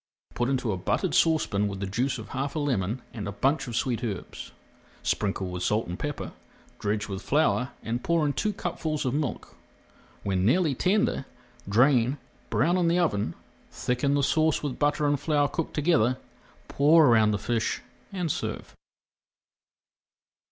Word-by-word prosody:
Put 120 +1 0
into 130 -4 0
a 95 - -2
buttered 90 - -1
saucepan 150 -11 +2
with 100 -1 -5
the 100 - -2
juice 125 +8 -1
of 110 -2 -9
half 140 +3 -3
a - - 0
lemon 120 -5 -1
and 105 -4 -5
a - - -3
bunch 135 +9 0
of 120 - -5
sweet 125 0 -1
herbs. 100 -6 -5 0.5
Sprinkle 95 -2 -1
with 90 0 -5
salt 105 +4 +1
and 90 +1 -6
pepper, 145 -1 -4 0.5
dredge 105 +1 -1
with 95 -1 -5
flour, 140 -2 +1
and 120 +2 -3
pour 170 -2 +2
in 145 - +1
two 210 +10 0
cupfuls 160 -6 -3
of 130 - 0
milk. 145 -5 -3 0.7
When 95 -2 0
nearly 150 - +3
tender, 195 - +1 0.4
drain, 125 +4 +4 0.3
brown 170 +7 +2
in 175 -2 +2
the 170 +1 +3
oven, 105 - 0 0.3
thicken 130 +3 0
the 140 - +2
sauce 155 +2 +2
with 140 -4 -3
butter 145 +1 +2
and 145 -1 +2
flour 145 -1 +2
cooked 165 +2 -4
together, 130 -6 +2 0.5
pour 155 +3 +5
around 110 -4 +5
the 105 - +1
fish 115 +1 -1 0.3
and 180 -5 -1
serve. - - -5
130 Hz, 165 wpm, -27 LUFS, 105-150 Hz, 0.7 s, pour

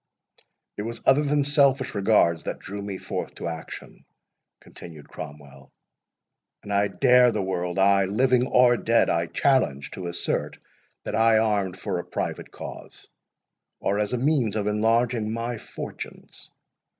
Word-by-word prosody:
"It - - -3
was 115 +2 -5
other 135 +2 +5
than 145 0 +1
selfish 140 -2 +2
regards 95 -5 +2
that - - -3
drew 100 +2 -7
me 100 -1 -5
forth - - -5
to - - -5
action," 80 -1 -8 0.6
continued 80 -4 -12
Cromwell, 70 -2 -11 0.9
"and 100 - -5
I 100 +1 +3
dare 125 +4 +4
the 105 -3 -2
world—ay, 95 +2 +2
living 125 +5 +2
or 125 -1 +4
dead 115 +1 +2
I 85 0 0
challenge—to 90 - 0
assert 85 0 -2 0.5
that - - -5
I 115 0 +4
armed 100 -4 0
for 90 - -3
a - - -4
private - - -4
cause, - - -9 0.7
or 100 +1 0
as 105 -1 -1
a - - +1
means 130 -5 +1
of 105 -2 -1
enlarging 110 +1 +1
my 115 0 -3
fortunes. - - -9
105 Hz, 140 wpm, -25 LUFS, 95-120 Hz, 0.9 s, other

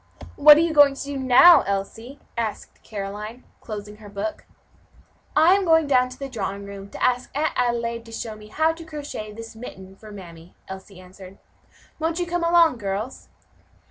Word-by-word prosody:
"What 300 +1 +8
are - - +4
you 335 -1 0
going 290 -2 +6
to - - -6
do 285 0 -6
now, 265 +7 +7
Elsie?" 225 +7 -4 0.2
asked 225 -3 -5
Caroline, 210 +3 -7 0.2
closing 210 -1 -8
her 210 -1 -13
book. 200 +11 -5 0.9
"I 320 +4 +6
am 395 0 +2
going 325 -3 +4
down 255 -3 +2
to 255 - -11
the 275 - -6
drawing 200 -5 -5
room 200 0 -9
to - - -7
ask 250 0 +1
Aunt 310 +1 0
Adelaide 235 -1 -1
to 230 - -13
show 225 -1 -6
me 210 0 -13
how 315 +9 +1
to 330 +1 -10
crochet 290 -9 -7
this 225 +1 -10
mitten 190 -5 -10
for 215 +2 -14
mammy," 170 -4 -12
Elsie 190 0 -10
answered. 185 +1 -14 0.6
"Won't 325 +1 -1
you 355 - -1
come 350 0 -2
along, 335 -6 +4
girls?" 205 +5 -5
235 Hz, 180 wpm, -23 LUFS, 200-295 Hz, 0.9 s, What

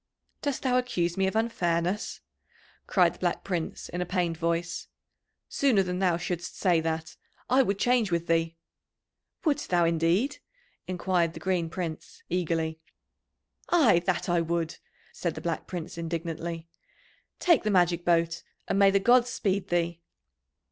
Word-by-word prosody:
"Dost 285 -3 -2
thou 255 -1 +3
accuse 175 -9 -1
me 190 0 +1
of 190 - -2
unfairness?" 185 -4 0 0.7
cried - - +4
the - - -18
Black - - -1
Prince 175 -4 -3
in 175 - -4
a - - 0
pained 175 -3 0
voice. 170 0 -2 0.6
"Sooner 250 -9 +3
than 180 0 -3
thou 180 -3 +2
shouldst 175 0 -4
say 175 -4 +3
that, 160 0 -3 0.3
I 260 +1 +6
would 200 -6 0
change 245 -1 +2
with 170 0 0
thee." 165 -1 0 0.9
"Wouldst 295 -2 0
thou, 175 -1 +3
indeed?" 170 - +1 0.5
enquired 180 -2 0
the - - -6
Green 180 -3 0
Prince 165 -3 -6
eagerly. 165 -2 -1 0.9
"Ay, 275 - +5
that 185 -2 0
would 170 -1 0
I," - - -17 0.4
said 170 -3 -3
the - - -5
Black 170 -1 -3
Prince 170 -2 -6
indignantly. 165 0 -4 0.7
"Take 340 -6 +4
the 215 - -1
magic 175 -3 +3
boat, 170 -1 +2 0.3
and 195 - +1
may 200 -1 +7
the 195 0 +3
gods 245 +4 +4
speed 200 -5 -1
thee." 170 -1 -1
175 Hz, 150 wpm, -28 LUFS, 165-195 Hz, 0.9 s, may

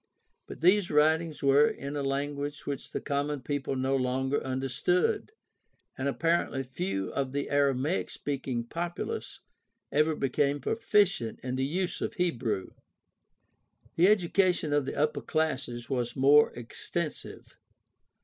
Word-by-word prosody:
But - - -9
these 185 +2 +4
writings 155 +1 +2
were 140 +2 +6
in 140 +3 -6
a 145 - -1
language 145 +1 -3
which 140 -2 -4
the - - -3
common 145 0 -1
people 145 +1 -2
no 130 +1 +1
longer 130 +1 0
under 130 +1 -2
stood, 180 - +1 0.6
and 135 +1 -2
apparently 165 -2 0
few 95 -7 -3
of 135 -1 -2
the 140 0 -2
Aramaic 140 +3 +1
speaking 130 -4 -3
populace 170 +8 -5 0.5
ever 155 +2 +2
became 140 +1 +1
proficient 195 - +1
in 125 0 -2
the 130 +1 0
use 180 +4 -2
of - - -3
Hebrew. 125 - -1 1.2
The 175 +3 +5
education 180 -5 +2
of 145 -2 +1
the - - -3
upper 150 +1 0
classes 130 -6 -2
was 120 -3 -2
more 140 +3 +6
extensive. 120 -1 -5
140 Hz, 130 wpm, -29 LUFS, 130-160 Hz, 1.2 s, were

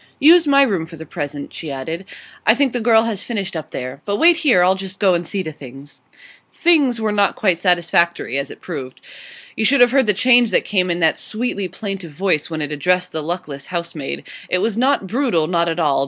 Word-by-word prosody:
'Use 325 +2 +6
my 280 -1 +5
room 190 -11 -1
for 165 - -11
the 160 0 -10
present,' 145 -3 -6
she 160 - -7
added. 160 +7 -5 0.4
'I 220 - +6
think 270 -1 +1
the 245 - -2
girl 225 -1 +4
has 220 -4 -3
finished 200 -6 -4
up 160 - -6
there. 130 +2 -6
But 205 0 -2
wait 335 +4 +5
here; 265 - +3
I'll 185 +1 +4
just 190 0 -7
go 190 -3 +3
and 170 -1 -1
see 195 -2 -3
to 160 - -5
things.' 135 0 -13 0.5
'Things' 290 -9 +2
were 220 -1 -1
not 205 -1 +1
quite 185 -5 +1
satisfactory, 170 -6 +1
as 140 +1 -5
it - - -12
proved. 135 -7 -7 0.6
You 220 - -1
should 275 +5 +3
have 245 -1 +6
heard 265 -3 +2
the 210 - +2
change 245 +1 +4
that - - +1
came 185 -3 0
in 175 0 -1
that 160 - +2
sweetly 215 -4 -3
plaintive 195 -4 -6
voice 175 -2 0
when 160 -2 -3
it 145 - -5
addressed 180 +5 0
the 160 - -3
luckless 150 -4 -5
housemaid. 170 -5 -5 0.2
It - - +1
was 215 +3 -1
not 255 -2 +1
brutal; 215 - 0
not 170 0 0
at 165 +1 -3
all. 145 -4 +2
185 Hz, 225 wpm, -19 LUFS, 160-225 Hz, 0.6 s, Use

